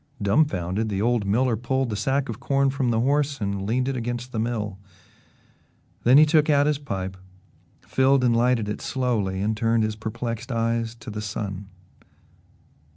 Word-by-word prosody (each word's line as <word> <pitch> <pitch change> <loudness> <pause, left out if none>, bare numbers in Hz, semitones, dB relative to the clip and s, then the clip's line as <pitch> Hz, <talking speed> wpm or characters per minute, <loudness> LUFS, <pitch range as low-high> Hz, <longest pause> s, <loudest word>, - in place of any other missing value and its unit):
Dumfounded, 100 - +1
the 100 -2 -2
old 115 -1 +1
miller 120 +4 +2
pulled 125 +2 -1
the - - -1
sack 135 +5 0
of 115 -2 -6
corn 140 -1 +1
from 135 -2 -1
the 115 -1 +1
horse 140 +1 +1
and 100 -1 -3
leaned 125 +4 0
it 135 - -1
against 120 +1 -4
the 110 - -3
mill. 105 -4 -2 1.3
Then 125 +3 +7
he 155 - +8
took 155 0 +3
out 145 -1 +4
his 150 -1 +1
pipe, 95 -9 -4 0.7
filled 130 +7 +2
and 120 -2 +3
lighted 120 -2 +2
it 105 - -4
slowly 110 -8 -1
and 110 +2 0
turned 115 0 +1
his 110 0 -1
perplexed 115 +2 -5
eyes 115 0 -1
to 110 -1 -9
the 105 0 -5
sun. 100 -2 -5
115 Hz, 170 wpm, -24 LUFS, 105-130 Hz, 1.3 s, he